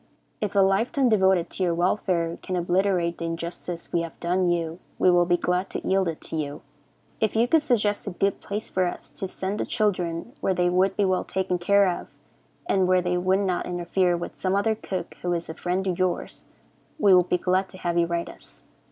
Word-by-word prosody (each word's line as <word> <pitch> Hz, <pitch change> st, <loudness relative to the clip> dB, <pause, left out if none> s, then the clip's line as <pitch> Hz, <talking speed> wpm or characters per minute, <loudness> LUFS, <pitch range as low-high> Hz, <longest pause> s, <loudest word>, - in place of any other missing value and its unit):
If 210 Hz, -1 st, -2 dB
a 200 Hz, -, +6 dB
life 195 Hz, +5 st, +2 dB
time 270 Hz, -3 st, +2 dB
devoted 190 Hz, -5 st, +3 dB
to -, -, -6 dB
your 175 Hz, -2 st, +2 dB
welfare 175 Hz, -1 st, 0 dB
can 185 Hz, -, -4 dB
obliterate 175 Hz, -1 st, +1 dB
the 170 Hz, -, -3 dB
injustice 170 Hz, +1 st, -5 dB
we 170 Hz, -, +2 dB
have 165 Hz, -1 st, -7 dB
done 180 Hz, +1 st, +1 dB
you, 170 Hz, -1 st, -1 dB, 0.2 s
we 185 Hz, -, +4 dB
will 175 Hz, 0 st, +4 dB
be 175 Hz, 0 st, +3 dB
glad 180 Hz, +2 st, -1 dB
to -, -, -5 dB
yield 190 Hz, -1 st, +2 dB
it 165 Hz, -2 st, -3 dB
to -, -, -5 dB
you. 150 Hz, -1 st, -4 dB, 0.6 s
If 220 Hz, -1 st, 0 dB
you 230 Hz, +2 st, +3 dB
could 320 Hz, +4 st, +4 dB
suggest 215 Hz, -7 st, 0 dB
a -, -, +1 dB
good 195 Hz, +1 st, -1 dB
place 210 Hz, +1 st, -4 dB
for 185 Hz, -1 st, 0 dB
us -, -, -7 dB
to 190 Hz, -, -4 dB
send 190 Hz, +2 st, -4 dB
the -, -, 0 dB
children, 180 Hz, -1 st, -1 dB
where 190 Hz, -, +1 dB
they 175 Hz, 0 st, +2 dB
would 190 Hz, +2 st, +2 dB
be 205 Hz, -, +3 dB
well 185 Hz, -1 st, +1 dB
taken 185 Hz, -1 st, -2 dB
care 200 Hz, +3 st, +4 dB
of, -, -, -14 dB, 0.6 s
and 190 Hz, -, +2 dB
where 185 Hz, -1 st, +3 dB
they 180 Hz, 0 st, 0 dB
would 185 Hz, +2 st, +2 dB
not 185 Hz, -3 st, -1 dB
interfere 175 Hz, 0 st, +1 dB
with 170 Hz, -, -7 dB
some 185 Hz, 0 st, 0 dB
other 210 Hz, +2 st, +2 dB
cook 190 Hz, -5 st, -5 dB
who 175 Hz, 0 st, 0 dB
is 170 Hz, -1 st, -3 dB
a -, -, -4 dB
friend 180 Hz, +3 st, -2 dB
of 185 Hz, -2 st, -1 dB
yours, 185 Hz, -1 st, -2 dB, 0.5 s
we 200 Hz, -10 st, +5 dB
would 180 Hz, -1 st, +5 dB
be 180 Hz, -, +3 dB
glad 185 Hz, +2 st, 0 dB
to 185 Hz, -, -11 dB
have 175 Hz, -2 st, -2 dB
you 170 Hz, -1 st, +3 dB
write 170 Hz, 0 st, -2 dB
us. -, -, -13 dB
185 Hz, 225 wpm, -25 LUFS, 175-195 Hz, 0.6 s, a